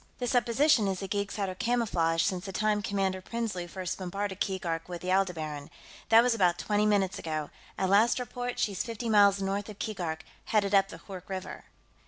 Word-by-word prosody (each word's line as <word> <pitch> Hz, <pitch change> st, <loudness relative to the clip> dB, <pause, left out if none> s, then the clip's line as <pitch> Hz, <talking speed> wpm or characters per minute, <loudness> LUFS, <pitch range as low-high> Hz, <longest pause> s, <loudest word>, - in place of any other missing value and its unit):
The 250 Hz, -, -3 dB
supposition 245 Hz, -1 st, +3 dB
is 190 Hz, -1 st, -1 dB
the 195 Hz, -, -4 dB
geeks 200 Hz, 0 st, -2 dB
had 200 Hz, -2 st, -1 dB
her 185 Hz, -, -3 dB
camouflaged 185 Hz, -7 st, +1 dB
since 185 Hz, -1 st, -2 dB
the 195 Hz, -, -5 dB
time 210 Hz, +1 st, +1 dB
Commander 195 Hz, -2 st, -1 dB
Prinsloo 205 Hz, -4 st, -3 dB
first 185 Hz, 0 st, -5 dB
bombarded 190 Hz, +1 st, -3 dB
Keegark 175 Hz, -4 st, -2 dB
with 175 Hz, -1 st, -6 dB
the 185 Hz, -, -1 dB
Aldebaran. 160 Hz, -7 st, -1 dB, 0.4 s
That 225 Hz, +1 st, +7 dB
was 250 Hz, -1 st, +3 dB
about 180 Hz, -6 st, +2 dB
twenty 210 Hz, +2 st, +1 dB
minutes 200 Hz, -2 st, +1 dB
ago; 155 Hz, -2 st, -4 dB, 0.3 s
at 190 Hz, -, +1 dB
last 210 Hz, +5 st, +4 dB
report, 245 Hz, 0 st, -4 dB
she's 200 Hz, -3 st, 0 dB
fifty 230 Hz, 0 st, -4 dB
miles 200 Hz, -2 st, +5 dB
north 200 Hz, +2 st, -2 dB
of 210 Hz, -, -9 dB
Keegark, 175 Hz, -8 st, -3 dB, 0.2 s
headed 205 Hz, -2 st, +1 dB
up 195 Hz, -1 st, +5 dB
the -, -, -8 dB
Hoork 190 Hz, -2 st, -9 dB
River." 190 Hz, -1 st, -6 dB
195 Hz, 195 wpm, -29 LUFS, 185-215 Hz, 0.4 s, That